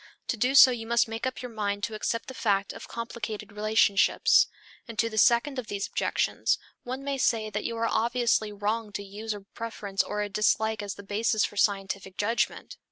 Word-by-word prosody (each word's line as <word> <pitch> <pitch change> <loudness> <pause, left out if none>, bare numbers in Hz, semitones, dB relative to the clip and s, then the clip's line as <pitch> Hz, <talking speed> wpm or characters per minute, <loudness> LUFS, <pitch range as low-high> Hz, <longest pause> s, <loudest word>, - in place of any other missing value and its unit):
To - - +1
do 250 +5 +1
so 265 -2 +10
you 225 -2 -5
must 235 0 +3
make 225 +3 -3
up 255 0 -5
your 250 - -6
mind 205 -2 -2
to 230 - -2
accept 230 +2 -2
the 260 - -7
fact 200 -4 0
of - - -10
complicated 220 -2 -6
relationships. 210 -1 +4 0.4
And 230 -2 -9
to 230 +1 +1
the 220 - -6
second 240 +5 +3
of 240 - -6
these 200 -1 -3
objections - - 0 0.2
one 260 +2 -5
may 280 -1 -2
say 220 -3 +1
that 210 0 -3
you 230 - -3
are 230 - 0
obviously 230 -1 +1
wrong 210 +2 -2
to 205 - -4
use 210 +3 -6
a 205 - -9
preference 200 -1 -3
or 210 0 -2
a - - -2
dislike 210 +2 +1
as 200 -1 -5
the 200 - -11
basis 215 +2 +1
for - - -6
a - - -13
scientific 195 -1 0
judgment. 225 +3 -1
220 Hz, 210 wpm, -27 LUFS, 205-235 Hz, 0.4 s, so